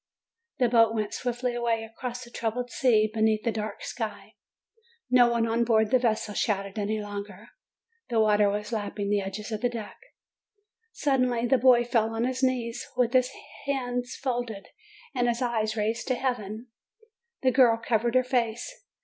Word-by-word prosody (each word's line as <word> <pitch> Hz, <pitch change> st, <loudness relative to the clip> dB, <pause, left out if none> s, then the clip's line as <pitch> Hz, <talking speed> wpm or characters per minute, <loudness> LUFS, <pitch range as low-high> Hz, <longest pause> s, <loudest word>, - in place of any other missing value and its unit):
The 250 Hz, -4 st, +3 dB
boat 230 Hz, -1 st, +4 dB
went 215 Hz, -2 st, -2 dB
swiftly 245 Hz, 0 st, -2 dB
away 235 Hz, -2 st, 0 dB
across 245 Hz, +2 st, -6 dB
the 240 Hz, -, -13 dB
troubled 240 Hz, +2 st, -3 dB
sea, 220 Hz, -5 st, +3 dB
beneath 220 Hz, -1 st, +2 dB
the 230 Hz, -, +1 dB
dark 215 Hz, -1 st, -5 dB
sky. -, -, -5 dB, 0.8 s
No 245 Hz, -1 st, +6 dB
one 235 Hz, -1 st, +1 dB
on 230 Hz, +1 st, +1 dB
board 220 Hz, -2 st, +2 dB
the 255 Hz, -, +5 dB
vessel 220 Hz, -3 st, 0 dB
shouted 200 Hz, -1 st, -1 dB
any 210 Hz, +1 st, -1 dB
longer. 205 Hz, -2 st, -7 dB, 0.6 s
The 230 Hz, -2 st, +1 dB
water 210 Hz, -1 st, +4 dB
was 210 Hz, +2 st, -3 dB
lapping 205 Hz, -2 st, -3 dB
the 205 Hz, -1 st, +2 dB
edge 195 Hz, +1 st, -5 dB
of 215 Hz, 0 st, -5 dB
the 245 Hz, -, +2 dB
deck. 225 Hz, -3 st, -7 dB, 0.9 s
Suddenly 255 Hz, -, +1 dB
the 255 Hz, +2 st, +3 dB
boy 245 Hz, -1 st, +6 dB
fell 225 Hz, -2 st, 0 dB
on 225 Hz, -, 0 dB
his 255 Hz, +1 st, -1 dB
knees, 245 Hz, -3 st, -1 dB
with 245 Hz, -1 st, +2 dB
his 255 Hz, -1 st, +4 dB, 0.4 s
hands 245 Hz, -3 st, -2 dB
folded 240 Hz, -6 st, -3 dB, 0.4 s
and 245 Hz, -2 st, +1 dB
his 235 Hz, 0 st, 0 dB
eyes 220 Hz, -3 st, 0 dB
raised 220 Hz, +2 st, -1 dB
to 255 Hz, -, +1 dB
heaven. 240 Hz, -2 st, -3 dB, 0.7 s
The 260 Hz, -, +4 dB
girl 245 Hz, -3 st, +5 dB
covered 230 Hz, +1 st, 0 dB
her 255 Hz, -, +5 dB
face. 245 Hz, -, -1 dB
235 Hz, 165 wpm, -27 LUFS, 215-245 Hz, 0.9 s, No